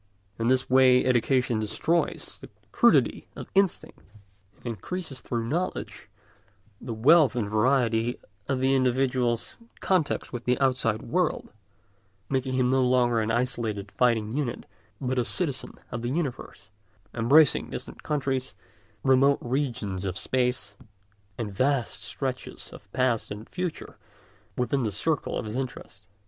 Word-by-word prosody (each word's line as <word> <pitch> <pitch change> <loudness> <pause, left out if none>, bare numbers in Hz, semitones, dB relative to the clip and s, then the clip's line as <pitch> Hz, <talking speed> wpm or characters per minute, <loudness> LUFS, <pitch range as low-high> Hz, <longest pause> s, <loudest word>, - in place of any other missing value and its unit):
In 115 - 0
this 130 +1 +2
way 130 -1 +5
education 125 -1 +2
destroys 155 +10 -1
the - - -11 0.2
crudity - - +3
of - - -9
instinct, 195 -2 +1 0.6
and - - -26
increases 135 - -5
through 120 -2 -3
knowledge 170 +9 -3 0.7
the 120 - -6
wealth 135 +5 +5
and 115 -4 -1
variety 115 +1 +1 0.3
of 135 -2 0
the 135 +1 +3
individual's 125 -2 +1 0.2
contacts 180 -8 0
with 120 -1 -5
the 125 0 +1
outside 125 -5 +1
world, 180 -1 -1 0.8
making 130 -1 -1
him 130 -1 +2
no 130 0 +3
longer 125 -2 +3
an 110 - -1
isolated 115 -4 -1
fighting 115 -2 +1
unit, 140 -5 -2 0.3
but 130 -1 -1
a - - +2
citizen 140 0 -2 0.2
of 120 - -4
the 120 - -2
universe, 130 - -4 0.4
embracing 135 +6 +4
distant - - -7
countries, 135 -3 -2 0.5
remote 135 +1 +4
regions 120 -7 -2
of 95 -1 -3
space, 125 -1 -1 0.6
and 105 -4 -4
vast 130 -1 0
stretches 130 +4 -5
of 100 - -14
past 130 -2 +1
and 105 +2 -7
future 180 -2 -5 0.6
within 135 +2 0
the 110 -3 -1
circle 150 +10 -1
of - - -4
his 105 +1 -5
interests. 125 -7 -6
125 Hz, 135 wpm, -27 LUFS, 115-135 Hz, 0.8 s, way